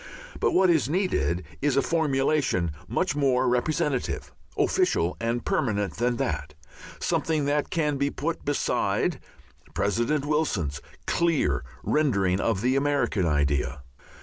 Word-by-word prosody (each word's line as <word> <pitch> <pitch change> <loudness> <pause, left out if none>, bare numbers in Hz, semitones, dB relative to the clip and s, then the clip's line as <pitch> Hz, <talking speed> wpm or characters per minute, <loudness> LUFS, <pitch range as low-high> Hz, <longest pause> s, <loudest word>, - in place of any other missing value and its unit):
But - - +1
what 185 -1 +5
is 150 -5 +2
needed 165 - 0 0.2
is 140 -1 +1
a - - +5
formulation 140 - +1 0.2
much - - 0
more 130 -3 +2
representative, 130 - 0 0.3
official 85 +2 +2
and 115 +1 -2
permanent 105 -7 0
than 120 +2 +1
that, 75 -4 -3 0.4
something 155 -3 0
that 145 +1 0
can 150 -4 0
be 140 +1 +1
put 160 +4 -3
beside 145 0 0 0.6
President 120 +8 0
Wilson's 105 - -1 0.2
clear 135 - +1 0.2
rendering 100 -12 +2
of 100 -4 0
the 125 +3 +2
American 140 -10 +1
idea. 75 -2 0
130 Hz, 120 wpm, -26 LUFS, 95-150 Hz, 0.6 s, what